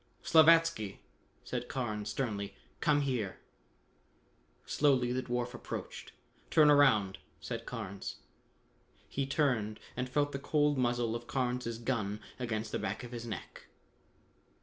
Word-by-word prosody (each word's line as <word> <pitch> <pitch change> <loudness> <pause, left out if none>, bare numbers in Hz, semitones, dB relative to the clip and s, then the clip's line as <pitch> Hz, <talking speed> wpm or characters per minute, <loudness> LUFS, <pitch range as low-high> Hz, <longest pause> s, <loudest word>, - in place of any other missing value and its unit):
"Slavatsky," 160 -10 +5 0.5
said 125 -1 -4
Carnes 110 -6 -2
sternly, 105 -6 -3 0.2
"come 145 -1 +3
here!" 125 -9 -1 1.3
Slowly 130 -4 +3
the 130 +1 0
dwarf 125 0 -2
approached. - - -6 0.4
"Turn 150 -2 +6
around!" 110 -10 +4 0.2
said - - -5
Carnes. 100 -5 -5 0.9
He 135 0 -2
turned 125 -7 +1 0.2
and 125 0 -2
felt 145 +2 +1
the 140 - -3
cold 145 +1 +2
muzzle 120 -2 +1
of 120 0 -6
Carnes' 125 -3 -1
gun 110 -4 -1 0.2
against 110 -3 -2
the - - -1
back 105 +3 -3
of 120 - -8
his 120 -1 -6
neck. 110 - -7
125 Hz, 125 wpm, -32 LUFS, 110-140 Hz, 1.3 s, Turn